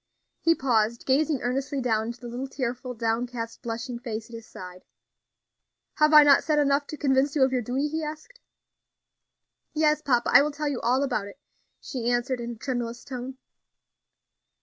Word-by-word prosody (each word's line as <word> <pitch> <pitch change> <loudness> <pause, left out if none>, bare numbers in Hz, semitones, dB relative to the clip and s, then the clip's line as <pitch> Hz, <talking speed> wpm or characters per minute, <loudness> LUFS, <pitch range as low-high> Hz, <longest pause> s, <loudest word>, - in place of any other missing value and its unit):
He 330 0 +3
paused, 235 -4 0
gazing 280 +1 +1
earnestly 270 +3 -1
down 225 -3 0
into 235 +1 -7
the 240 - -7
little 245 +3 -5
tearful, 255 -1 -4
downcast, 230 +1 -3
blushing 235 +1 -5
face 225 -1 -6
at - - -8
his 230 -1 -10
side. 180 0 -10 1.1
"Have 305 0 +4
I 300 -1 +9
not 285 -1 +6
said 305 -1 +1
enough 285 0 +2
to 305 - -7
convince 275 0 +1
you 280 - +4
of 260 - +3
your 255 -1 0
duty?" 255 +5 -1
he 315 +1 -3
asked. 310 +12 -8 1.4
"Yes, 305 0 +2
papa; 245 -3 +1
I - - +9
will 295 - +1
tell 300 +1 -4
you 270 -4 -3
all 255 +4 +2
about 225 -7 -1
it," 200 - -13 0.4
she 245 -3 -4
answered 245 +1 0
in 235 0 -4
a - - -10
tremulous 240 -1 -4
tone. 260 0 -6
255 Hz, 175 wpm, -26 LUFS, 235-285 Hz, 1.4 s, I